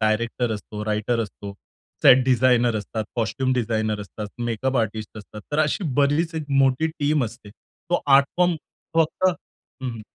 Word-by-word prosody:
Director 115 +2 0
असतो, 105 0 -6
writer 110 +2 0
असतो, 100 -2 -6 0.5
set 130 0 +7
designer 125 -2 +3
असतात, 110 +1 -4
कॉस्ट्यूम 130 +3 0
डिझाइनर 110 -3 -1
असतात, 105 +1 -7 0.2
मेकअप 120 +3 -1
आर्टिस्ट 110 -1 -2
असतात. 105 +1 -10
तर 145 - 0
अशी 155 +5 +1
बरीच 145 +4 +2
एक 160 -1 -3
मोठी 135 +2 +3
टीम 145 -2 +2
असते. 110 -1 -9
तो 170 +10 -5
आर्ट 140 0 +6
फॉर्म 180 -1 +3 0.4
फक्त 165 +3 +1
हं, 185 - +3 0.6
हं. 115 -2 -8
120 Hz, 155 wpm, -23 LUFS, 110-140 Hz, 0.6 s, set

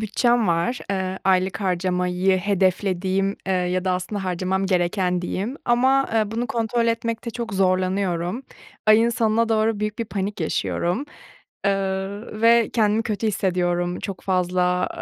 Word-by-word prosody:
bütçem 230 +1 +2
var. 170 +9 +1
Eee, 190 -1 -2
aylık 190 +1 +2
harcamayı 180 0 +1
hedeflediğim, 190 0 0
eee, 190 - +1
ya 180 0 0
da 185 - +1
aslında 190 +2 -3
harcamam 185 +1 -1
gereken 180 -1 0
diyeyim 205 +9 -3
ama, 260 +3 +3
eee, 215 -2 +1
bunu 230 +2 -2
kontrol 230 0 0
etmekte 230 0 -2
çok 230 -2 -5
zorlanıyorum. 185 +2 0 0.4
Ayın 215 +2 +6
sonuna 230 -1 +1
doğru 220 -1 +1
büyük 210 0 -3
bir 230 - -1
panik 200 -2 -4
yaşıyorum. 175 - -1 0.6
Eee, 200 -1 +3 0.6
ve 230 0 +5
kendimi 215 -1 +2
kötü 220 -1 -2
hissediyorum, 175 -3 0
çok 195 -2 -5
fazla, 180 -1 +1
195 Hz, 135 wpm, -23 LUFS, 180-225 Hz, 0.6 s, Ayın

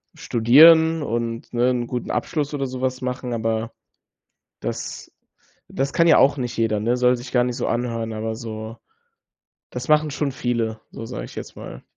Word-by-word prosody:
studieren 160 +7 +6
und, 115 -1 -3
ne, 120 +1 +2
'n 120 -1 -2
guten 125 -1 -4
Abschluss 145 +4 -2
oder 135 -2 -2
sowas 130 0 -3
machen. 125 -1 -3
Aber 115 0 -2 0.9
das - - -5 0.6
das 135 +1 -2
kann 170 - +3
ja - - +7
auch 140 +2 +4
nicht 125 -2 -3
jeder, 110 -2 +1
ne? 120 +3 +1
Soll 125 0 +3
sich 125 +1 -10
gar 125 -1 +4
nicht 125 0 -3
so 125 - -2
anhören, 115 -2 -2
aber 110 +1 -3
so 110 0 -7 1.0
das - - -6
machen 150 0 +4
schon 140 -1 -2
viele, 115 -3 -2
so 115 - -8
sage 125 - -6
ich - - -13
jetzt - - -8
mal. - - -10
125 Hz, 175 wpm, -22 LUFS, 115-135 Hz, 1.0 s, ja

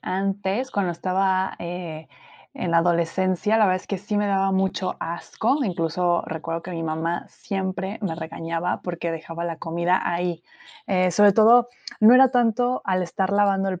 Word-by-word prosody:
antes, 195 +5 -2
cuando 190 -4 -1
estaba, 190 +2 0
eh, 170 -2 -6 0.5
en 175 - -3
la 165 - +4
adolescencia, 180 +4 +1
la 215 - +5
verdad 185 -1 +2
es - - -20
que 195 - -2
sí 205 +2 -4
me 205 0 +1
daba 195 0 +1
mucho 190 -1 -1
asco, 220 - -2
incluso 175 -1 0
recuerdo 165 +1 -4
que 185 - -8
mi 165 -2 -4
mamá 160 +2 -2
siempre 190 +1 -4
me 190 -6 -2
regañaba, 165 +1 -4
porque 170 -1 -4
dejaba 165 +1 -6
la 165 -2 -3
comida 170 +3 0
ahí, 175 -1 -2 0.4
eh, 185 -2 +2
sobre 205 +3 +5
todo, 230 +4 +6 0.3
no 220 +3 +7
era 260 0 +7
tanto 245 0 +1
al 185 -1 0
estar 190 +2 -2
lavando 200 -1 +2
el 185 -1 -5
185 Hz, 170 wpm, -23 LUFS, 170-200 Hz, 0.5 s, no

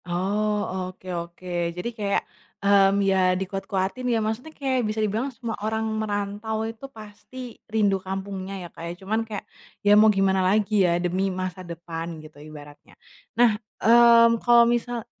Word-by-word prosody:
Oh, 205 +4 0 0.2
oke 185 0 -16 0.2
oke. 170 +2 -12 0.3
Jadi 180 +7 -3
kayak, 200 -2 0 0.4
mmm, 200 0 +4
ya 190 - +3 0.2
dikuat-kuatin 195 +4 -3
ya. 235 - +2
Maksudnya 220 +8 -3
kayak 270 -4 -1
bisa 215 - -4
dibilang 220 +5 0
semua 230 -3 -6
orang 220 +1 -1 0.2
merantau 205 +1 -3
itu 225 +4 -7
pasti 215 +4 -13 0.3
rindu 205 -3 +1
kampungnya 190 0 -5
ya, - - -7
Kak, - - -12
ya. - - -4
Cuman 220 +3 0
kayak 210 -2 -6 0.4
ya 205 - +5
mau 220 0 +7
gimana 190 -1 +3
lagi 210 +1 +1 0.2
ya, 170 - +2
demi 180 +2 0
masa 185 0 -4
depan 170 -1 -7
gitu 155 -1 -15
ibaratnya. 145 -1 -13 0.4
Nah, 240 0 +6 0.4
mmm, 230 0 +6
kalau 240 -1 +6
misal 240 -1 -3
205 Hz, 155 wpm, -24 LUFS, 185-225 Hz, 0.4 s, mau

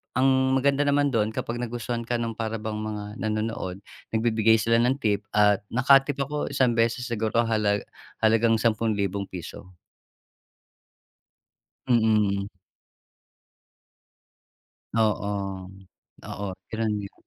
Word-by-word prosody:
ang 130 0 +3
maganda 140 +2 +2
naman 145 0 +2
do'n, 110 -3 +1
kapag 120 +1 -3
nagustuhan 120 0 -3
ka 120 - 0
ng 115 -1 -2
para 115 0 -3
bang 110 -1 -4
mga 105 0 -6
nanonood, 110 -4 -3 0.4
nagbibigay 110 -1 +3
sila 115 +1 +2
ng 125 +3 +2
tip 105 -2 +1
at 105 -1 +4
naka-tip 135 +3 +4
ako 145 +2 -3
isang 130 -3 +2
beses 115 +2 +1
siguro 115 0 0
halag 105 -2 +1 0.4
halagang 115 +1 +4
₱10,000. 100 -6 -2 2.2
Mm. 105 -4 +2 2.5
Oo, 100 -3 -1 0.6
oo 100 - -5 0.2
gano'n 110 -1 -1
nga. 100 -1 -7
110 Hz, 105 wpm, -25 LUFS, 105-120 Hz, 2.5 s, at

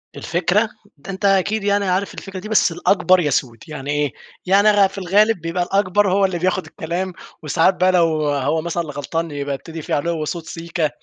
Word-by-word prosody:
الفكرة! 180 +6 0 0.3
ده 185 +8 -8
أنت 190 +2 -4
أكيد 200 +2 +2
يعني 200 0 +1
عارف 185 +2 -1
الفكرة 195 -1 -8
دي 215 +3 -8
بس 215 -5 +3
الأكبر 185 +1 +3
يَسود، 130 -6 0
يعني 145 -2 -5
إيه؟ 145 -3 0 0.3
يعني 200 +3 +5
غ 200 -1 +4
في 195 - -13
الغالب 195 +1 +2
بيبقى 170 +2 -1
الأكبر 195 +1 +1
هو 195 0 +3
اللي 180 -3 -2
بياخد 185 +1 0
الكلام، 175 +3 -4 0.3
وساعات 165 +5 +2
بقى 185 +1 +3
لو 165 -4 +2
هو 145 +3 0
مثلًا 170 +1 -2
اللي 145 -3 -8
غلطان 165 +3 -3
يبقى 140 -1 -3
يبتدي 160 +3 -8
فيه - - -2
عُلُوّ 155 +1 -1
صوت 170 0 -5
سيكا 165 -2 -2
175 Hz, 195 wpm, -20 LUFS, 160-195 Hz, 0.3 s, يعني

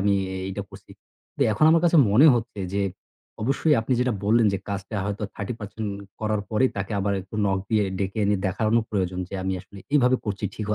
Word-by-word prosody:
আমি 100 +1 +2 0.2
এই 95 - -4
এইটা 100 +1 -4
করছি। 95 - -14 0.4
কিন্তু - - -2
এখন 105 - +2
আমার 165 +1 +4
কাছে 170 0 +4
মনে 125 +10 +7
হচ্ছে 115 -3 -3
যে 100 - +1 0.6
অবশ্যই 140 +5 +2
আপনি 115 +4 -2
যেটা 125 -1 +1
বললেন 115 +2 +4
যে, 100 - -1
কাজটা 100 +1 -4
হয়তো 105 +1 -3
30% 105 0 -5 0.3
করার 110 -1 0
পরেই 130 +4 +2
তাকে 95 +1 -3
আবার 100 +1 0
একটু 95 +3 -12
knock 95 -1 +1
দিয়ে 110 -2 +3
ডেকে 100 +2 -2
এনে 100 0 +2
দেখানো 110 +4 +1
প্রয়োজন 95 -3 -1
যে, - - -8
আমি 95 0 -1
আসলে 100 - -14
এইভাবে 130 -3 +4
করছি। 105 -2 -3
ঠিক 105 - -5
105 Hz, 200 wpm, -24 LUFS, 100-115 Hz, 0.6 s, মনে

